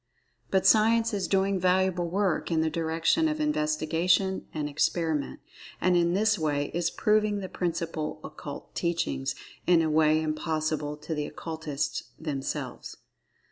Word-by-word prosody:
But 190 Hz, -1 st, +2 dB
Science 225 Hz, +1 st, +4 dB
is 200 Hz, -2 st, -1 dB
doing 195 Hz, 0 st, +2 dB
valuable 180 Hz, -1 st, +2 dB
work 195 Hz, 0 st, 0 dB
in 165 Hz, -2 st, +2 dB
the 160 Hz, 0 st, 0 dB
direction 165 Hz, -, +1 dB
of 310 Hz, 0 st, -2 dB
investigation 175 Hz, -, +1 dB
and 150 Hz, -2 st, -3 dB
experiment, 150 Hz, 0 st, -1 dB, 0.4 s
and 180 Hz, 0 st, +3 dB
in[Pg -, -, +5 dB
7] 170 Hz, -, +1 dB
this 215 Hz, 0 st, +2 dB
way 145 Hz, -2 st, -1 dB
is 170 Hz, -1 st, +1 dB
proving 210 Hz, -1 st, +2 dB
the 195 Hz, -2 st, -4 dB
principal 165 Hz, -3 st, -3 dB
occult 150 Hz, -1 st, -8 dB
teachings 70 Hz, -, -1 dB, 0.3 s
in 170 Hz, -2 st, +5 dB
a 160 Hz, -, 0 dB
way 155 Hz, 0 st, +4 dB
impossible 155 Hz, -1 st, -2 dB
to 150 Hz, +2 st, -5 dB
the 150 Hz, -1 st, -2 dB
Occultists 155 Hz, -2 st, -4 dB
themselves. 145 Hz, -4 st, -4 dB
165 Hz, 140 wpm, -28 LUFS, 155-190 Hz, 0.4 s, in[Pg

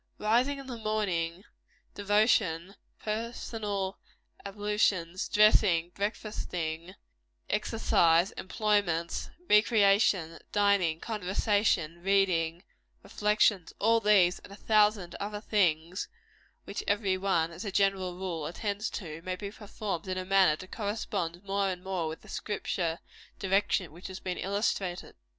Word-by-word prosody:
Rising 245 Hz, +6 st, +2 dB
in 275 Hz, -, -9 dB
the 245 Hz, -3 st, -7 dB
morning, 190 Hz, -5 st, -1 dB, 0.5 s
devotion, 200 Hz, -3 st, +2 dB, 0.2 s
personal 215 Hz, -3 st, -3 dB, 0.4 s
ablutions, 200 Hz, -3 st, 0 dB
dressing, 200 Hz, -5 st, +4 dB
breakfasting, 180 Hz, -5 st, -4 dB, 0.6 s
exercise, 170 Hz, +2 st, +3 dB
employments, 195 Hz, -5 st, -1 dB, 0.2 s
recreations, 200 Hz, -5 st, +4 dB
dining, 200 Hz, -6 st, +2 dB
conversation, 195 Hz, -5 st, 0 dB
reading, 180 Hz, -3 st, +1 dB, 0.4 s
reflection 210 Hz, -3 st, +2 dB
all 230 Hz, +2 st, +3 dB
these, 195 Hz, -5 st, +4 dB
and -, -, -15 dB
a -, -, -9 dB
thousand 210 Hz, -3 st, +2 dB
other 205 Hz, +1 st, -4 dB
things 180 Hz, -4 st, 0 dB, 0.6 s
which -, -, -5 dB
every 200 Hz, -2 st, +1 dB
one, 185 Hz, -4 st, 0 dB
as 165 Hz, -, -8 dB
a 200 Hz, -, -4 dB
general 190 Hz, -2 st, +1 dB
rule, 175 Hz, -5 st, -4 dB
attends 205 Hz, +4 st, -3 dB
to 165 Hz, -4 st, -7 dB
may 185 Hz, +1 st, -3 dB
be 200 Hz, +1 st, -6 dB
performed 205 Hz, -4 st, -5 dB
in 185 Hz, 0 st, -2 dB
a 185 Hz, -, -3 dB
manner 190 Hz, -4 st, +4 dB
to 185 Hz, -, -10 dB
correspond 200 Hz, -4 st, -3 dB
more 200 Hz, 0 st, 0 dB
and 180 Hz, -1 st, -5 dB
more 185 Hz, -4 st, -2 dB
with 160 Hz, +1 st, -6 dB
the -, -, -17 dB
Scripture 180 Hz, -5 st, -2 dB, 0.4 s
direction 195 Hz, -3 st, +1 dB
which 175 Hz, +4 st, -10 dB
has 190 Hz, 0 st, -7 dB
been 180 Hz, -1 st, -4 dB
illustrated. 195 Hz, -2 st, -2 dB
195 Hz, 120 wpm, -29 LUFS, 175-210 Hz, 0.6 s, dressing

